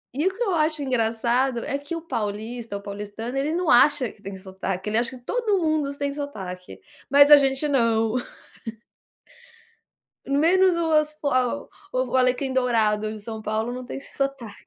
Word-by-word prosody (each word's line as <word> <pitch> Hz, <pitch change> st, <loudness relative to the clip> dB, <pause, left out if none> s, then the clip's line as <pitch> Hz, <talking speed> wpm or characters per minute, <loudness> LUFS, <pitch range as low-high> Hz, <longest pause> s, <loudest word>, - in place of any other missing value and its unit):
E 300 Hz, +6 st, +1 dB
o 380 Hz, -, -1 dB
que 485 Hz, -, 0 dB
eu 390 Hz, -6 st, 0 dB
acho 310 Hz, -1 st, 0 dB
engraçado 240 Hz, 0 st, +1 dB
é -, -, -2 dB
que 285 Hz, +4 st, -6 dB
o 330 Hz, -, -5 dB
paulista, 220 Hz, -4 st, -4 dB
o -, -, -10 dB
paulistano, 210 Hz, +4 st, -6 dB
ele 280 Hz, +3 st, 0 dB
não 355 Hz, -2 st, -1 dB
acha 260 Hz, 0 st, +5 dB
que 205 Hz, -, -23 dB
tem 195 Hz, -1 st, -7 dB
sotaque, 190 Hz, 0 st, -5 dB
acha 245 Hz, +2 st, 0 dB
que 245 Hz, -, -21 dB
todo 455 Hz, -, 0 dB
mundo 310 Hz, -4 st, 0 dB
tem 280 Hz, 0 st, -2 dB
sotaque. 190 Hz, -11 st, -7 dB, 0.3 s
Mas 285 Hz, +1 st, +6 dB
a 295 Hz, -, +12 dB
gente 270 Hz, +1 st, +1 dB
não. 230 Hz, -4 st, +2 dB, 2.1 s
Menos 345 Hz, +6 st, +3 dB
o 335 Hz, -1 st, 0 dB
as 305 Hz, 0 st, +2 dB
fo 300 Hz, -2 st, -3 dB, 0.6 s
o 255 Hz, 0 st, 0 dB
Alecrim 255 Hz, +1 st, +1 dB
Dourado 220 Hz, -4 st, +1 dB
em 215 Hz, 0 st, -6 dB
São 220 Hz, +1 st, -7 dB
Paulo 220 Hz, +2 st, -2 dB
não 250 Hz, +1 st, -6 dB
tem -, -, -7 dB
esse 275 Hz, -, -15 dB
sotaque. 275 Hz, -6 st, -4 dB
255 Hz, 170 wpm, -24 LUFS, 220-295 Hz, 2.1 s, a